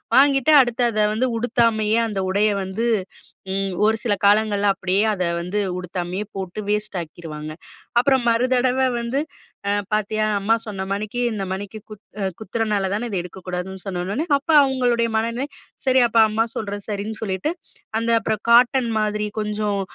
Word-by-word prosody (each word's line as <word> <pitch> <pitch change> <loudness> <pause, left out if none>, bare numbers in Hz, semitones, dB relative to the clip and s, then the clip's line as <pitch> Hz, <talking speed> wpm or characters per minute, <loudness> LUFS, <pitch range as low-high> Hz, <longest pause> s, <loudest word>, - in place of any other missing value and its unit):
வாங்கிட்டு 275 +1 +5
அடுத்து 240 0 0
அதை 215 -1 +1
வந்து 245 +4 +1
உடுத்தாமயே 225 -2 +2
அந்த 205 -3 -3
உடையை 205 +2 +2
வந்து, 190 +5 -3 0.7
ம் 195 -1 -1
ஒரு 220 +1 +3
சில 230 -4 +1
காலங்கள்ல 205 0 +3
அப்படியே 190 +1 +1
அதை 185 -3 -1
வந்து 180 +4 -2 0.2
உடுத்தாமயே 180 +2 -4
போட்டு, 190 +1 -5
வேஸ்ட் 210 -2 -1
ஆக்கிருவாங்க. 155 -2 -8 0.5
அப்பறம் 265 -1 +2
மறுதடவை 255 +2 +2
வந்து, 235 +4 -1 0.5
அ - - +2 0.2
பார்த்தியா! 215 +1 0
அம்மா 210 +3 +2
சொன்ன 200 -3 -5
மணிக்கு 215 +4 -4
இந்த 200 - -3
மணிக்கு 205 +3 -6
குத் 210 -1 -11 0.4
குத்துறனால 215 -2 -1
தான, 225 +4 -2
இத 200 - -4
எடுக்கக்கூடாதுன்னு 180 +1 -6
சொன்ன 185 -2 -3
உடன, 240 - -2
அப்ப 290 - -27
அவங்களுடைய 245 -3 +1
மனநிலை, 235 +5 -1 0.4
சரி 260 0 +4
அப்ப 230 - +3
அம்மா 220 +1 +1
சொல்றது 205 -2 -4
சரின்னு 210 +1 -4
சொல்லீட்டு, 190 - -1 0.5
அந்த 230 +1 -2
அப்பறம் 215 -1 -2
காட்டன் 245 +1 +5
மாதிரி 210 0 -1
கொஞ்சம் 210 -1 -1
215 Hz, 150 wpm, -22 LUFS, 195-235 Hz, 0.7 s, வாங்கிட்டு